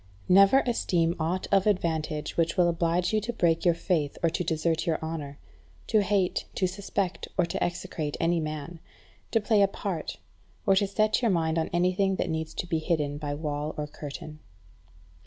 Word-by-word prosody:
7. - - +2
Never 195 +8 +7
esteem 175 -8 +1
aught 170 +4 -1
of 195 0 +4
advantage 160 -6 -1
which 165 0 +1
will 175 -1 +5
oblige 170 +2 +1
you 215 - +2
to 230 +3 -3
break 170 -7 +1
your 175 -3 +4
faith, 160 -5 -1
or 165 - +3
to 180 - -1
desert 165 0 0
your 160 - +2
honour; 155 -3 -5 0.5
to 215 - +3
hate, 195 -2 +1
to 185 - +1
suspect, 190 0 -2
or 180 - +4
to - - -2
execrate 160 -3 -3
any 170 +1 +2
man; 155 +1 -5 0.5
to 225 - +2
play 210 -1 +3
a 200 - +6
part; 190 -4 -4 0.5
or 195 -3 +5
to 200 +1 +2
set 215 +3 +1
your 235 - +2
mind 165 -3 +1
on 160 - -1
anything 185 +2 +2
that 180 - -1
needs 160 0 -3
to - - -3
be 165 -2 -1
hidden 150 -3 -1
by 145 -1 -3
wall 150 0 -3
or 150 - -2
curtain. 150 +1 -8
170 Hz, 190 wpm, -27 LUFS, 160-190 Hz, 0.5 s, Never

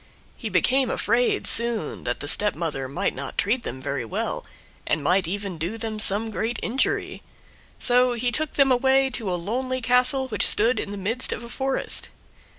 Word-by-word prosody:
He - - -5
became 265 0 +3
afraid, 235 +3 +1
soon, 235 -8 -1
that 120 0 -2
the 145 - -4
stepmother 165 -6 0
might 135 - -1
not 140 +1 -7
treat 220 +6 +1
them 130 - -6
very 140 -1 -3
well, 115 - -3 0.4
and 150 - 0
might 180 +3 +2
even 195 -2 -4
do 175 +8 -3
them 220 -1 -4
some 215 +2 +1
great 220 +3 -2
injury, 255 +4 -1 0.6
so 250 0 +3
he 245 +1 -1
took 310 +4 0
them 275 -2 +4
away 265 +1 +3
to 220 -5 -2
a - - 0
lonely 255 +8 -2
castle 250 +2 +3
which 240 - +3
stood 230 +4 +4
in - - -4
the 205 - -6
midst 225 +6 0
of - - -4
a 235 - -9
forest. 270 +2 0
225 Hz, 180 wpm, -24 LUFS, 180-250 Hz, 0.6 s, them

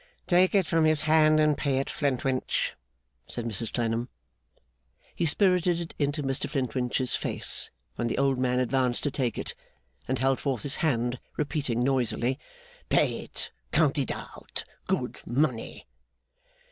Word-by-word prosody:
'Take 180 +2 +4
it 195 -3 +4
from 165 0 +2
his 155 -1 +4
hand 155 0 +5
and 150 -1 +4
pay 140 -3 +1
it, 135 - 0
Flintwinch,' 135 -2 0 0.5
said 120 - -4
Mrs 115 0 -2
Clennam. 115 +1 -1 1.0
He 170 - 0
spirted 180 0 +3
it 170 -1 -6
into 145 0 0
Mr 135 -1 -1
Flintwinch's 130 -1 0
face - - 0 0.3
when 120 - 0
the - - -2
old 135 -1 +2
man 125 -1 +1
advanced 125 -1 +1
to 145 - +1
take 125 -4 -1
it, - - -2 0.5
and 130 - 0
held 135 +2 +2
forth 130 -6 -2
his 145 - -2
hand, 125 -5 0 0.2
repeating 145 -5 0
noisily, 130 0 +1 0.5
'Pay - - +3
it! - - -6 0.2
Count 150 -2 +3
it 135 - -1
out! - - -6 0.2
Good - - -1
money! 125 -2 -1
135 Hz, 145 wpm, -28 LUFS, 125-155 Hz, 1.0 s, hand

